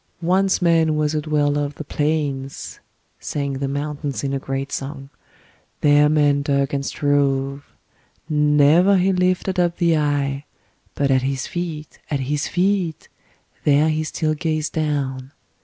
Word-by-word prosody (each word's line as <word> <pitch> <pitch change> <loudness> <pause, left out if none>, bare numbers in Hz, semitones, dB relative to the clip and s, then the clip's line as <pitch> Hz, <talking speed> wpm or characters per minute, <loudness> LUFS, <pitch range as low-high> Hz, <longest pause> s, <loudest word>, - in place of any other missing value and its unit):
'Once 185 +2 +1
man 165 -2 +3
was 150 0 0
a 155 - 0
dweller 145 -1 +1
of 145 0 -5
the 155 - -6
plains,' 145 -3 -3 0.4
sang 140 -1 -3
the 140 - -1
mountains 145 -3 -3
in 140 -1 -1
a 135 - -1
great 135 +1 -4
song; 135 0 -6 0.7
'there 145 0 +5
man 145 -2 +3
dug 140 -1 0
and 140 -1 -1
strove. 140 -1 0 0.6
Never 150 +5 +4
he 190 +1 +2
lifted 185 +1 0
up 175 -1 +1
the 170 -2 +3
eye, 145 -2 -1 0.5
but 140 -1 +1
at 130 -1 +3
his 135 0 -2
feet, 165 -4 -5
at 145 -3 -1
his 145 +3 -1
feet, 180 -3 -1 0.5
there 150 +2 +4
he 155 0 0
still 155 0 -1
gazed 155 0 -2
down. 140 -4 -2
150 Hz, 145 wpm, -21 LUFS, 140-160 Hz, 0.7 s, there